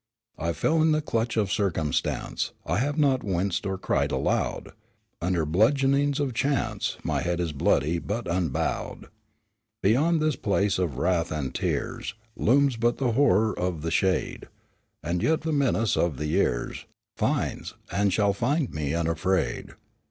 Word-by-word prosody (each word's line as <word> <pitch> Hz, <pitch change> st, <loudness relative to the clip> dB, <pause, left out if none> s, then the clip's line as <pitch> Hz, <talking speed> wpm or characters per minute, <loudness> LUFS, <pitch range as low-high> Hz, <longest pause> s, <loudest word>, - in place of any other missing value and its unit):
"In 85 Hz, -, -2 dB
the 85 Hz, -, +1 dB
fell 160 Hz, -1 st, +2 dB
clutch 115 Hz, -5 st, -1 dB
of 100 Hz, -4 st, +1 dB
circumstance, 80 Hz, -8 st, -1 dB
I -, -, 0 dB
have 145 Hz, +4 st, -1 dB
not 140 Hz, -4 st, +2 dB
winced 95 Hz, -1 st, -1 dB
nor 95 Hz, -1 st, -2 dB
cried -, -, 0 dB
aloud. -, -, -1 dB, 0.5 s
Under 90 Hz, 0 st, +1 dB
the -, -, -1 dB
bludgeonings 135 Hz, -, +2 dB
of 140 Hz, -4 st, -1 dB
chance, 135 Hz, +2 st, -1 dB
My -, -, -1 dB
head 85 Hz, 0 st, -1 dB
is 85 Hz, -2 st, -1 dB
bloody, 75 Hz, +3 st, +1 dB
but 110 Hz, +6 st, -4 dB
unbowed. 85 Hz, -4 st, -2 dB, 0.7 s
"Beyond 150 Hz, -, +3 dB
this 155 Hz, -2 st, +1 dB
place 100 Hz, -3 st, 0 dB
of 80 Hz, -9 st, -1 dB
wrath 85 Hz, +1 st, +1 dB
and 70 Hz, -5 st, -3 dB
tears 105 Hz, -, -2 dB, 0.2 s
Looms 135 Hz, +2 st, +3 dB
but 120 Hz, +1 st, +1 dB
the 130 Hz, -3 st, +1 dB
horror 110 Hz, -4 st, +3 dB
of 90 Hz, -4 st, -3 dB
the 80 Hz, -, -2 dB
shade, 95 Hz, +2 st, 0 dB, 0.6 s
And 85 Hz, +1 st, -1 dB
yet 160 Hz, 0 st, +2 dB
the 160 Hz, 0 st, -2 dB
menace 125 Hz, -6 st, +2 dB
of 85 Hz, -6 st, 0 dB
the 75 Hz, -, -3 dB
years 70 Hz, -5 st, -1 dB, 0.3 s
Finds, -, -, -1 dB, 0.2 s
and 100 Hz, 0 st, +2 dB
shall 100 Hz, +1 st, +2 dB
find 135 Hz, +7 st, 0 dB
me 75 Hz, 0 st, -2 dB
unafraid. 85 Hz, -4 st, -1 dB
100 Hz, 150 wpm, -26 LUFS, 85-135 Hz, 0.7 s, Beyond